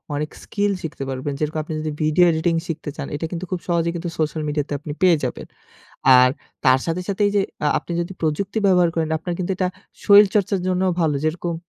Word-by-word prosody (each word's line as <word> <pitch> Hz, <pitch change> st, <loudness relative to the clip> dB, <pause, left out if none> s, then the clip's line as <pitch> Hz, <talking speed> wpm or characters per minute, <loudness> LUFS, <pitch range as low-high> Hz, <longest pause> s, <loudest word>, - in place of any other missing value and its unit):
অনেক 150 Hz, +1 st, -2 dB
স্কিল 205 Hz, -1 st, -1 dB
শিখতে 155 Hz, -3 st, -5 dB
পারবেন। 135 Hz, +2 st, -3 dB
যেরকম 155 Hz, +1 st, -1 dB
আপনি 160 Hz, -, -6 dB
যদি 155 Hz, 0 st, -3 dB
ভিডিও 155 Hz, +4 st, +4 dB
এডিটিং 160 Hz, +2 st, 0 dB
শিখতে 155 Hz, -2 st, -4 dB
চান, 145 Hz, -3 st, -5 dB
এটা 155 Hz, -, -3 dB
কিন্তু 175 Hz, +1 st, -4 dB
খুব 185 Hz, -, -1 dB
সহজেই 170 Hz, -1 st, +1 dB, 0.3 s
সোশ্যাল 155 Hz, 0 st, -1 dB
মিডিয়াতে 145 Hz, -1 st, -2 dB
আপনি 150 Hz, -, -7 dB
পেয়ে 180 Hz, -3 st, +5 dB
যাবেন। 125 Hz, -, -3 dB, 0.7 s
আর 125 Hz, -, +7 dB, 0.4 s
তার 130 Hz, 0 st, +6 dB
সাথে, 165 Hz, +2 st, -1 dB
সাথে 200 Hz, +1 st, -1 dB
এই -, -, -3 dB
যে 200 Hz, -, +4 dB, 0.2 s
আ -, -, +3 dB
আপনি 165 Hz, -, -8 dB
যদি 175 Hz, +2 st, -4 dB
প্রযুক্তি 185 Hz, +7 st, -1 dB
ব্যবহার 180 Hz, -2 st, +4 dB
করেন, 160 Hz, -2 st, 0 dB
আপনার 175 Hz, +2 st, -4 dB
কিন্তু 180 Hz, 0 st, -2 dB
এটা 185 Hz, 0 st, 0 dB, 0.4 s
শরীরচর্চার 200 Hz, -1 st, +5 dB
জন্য 185 Hz, 0 st, +1 dB, 0.2 s
ভালো 155 Hz, -3 st, +2 dB
যেরকম, 170 Hz, +2 st, -2 dB
165 Hz, 200 wpm, -21 LUFS, 150-185 Hz, 0.7 s, আর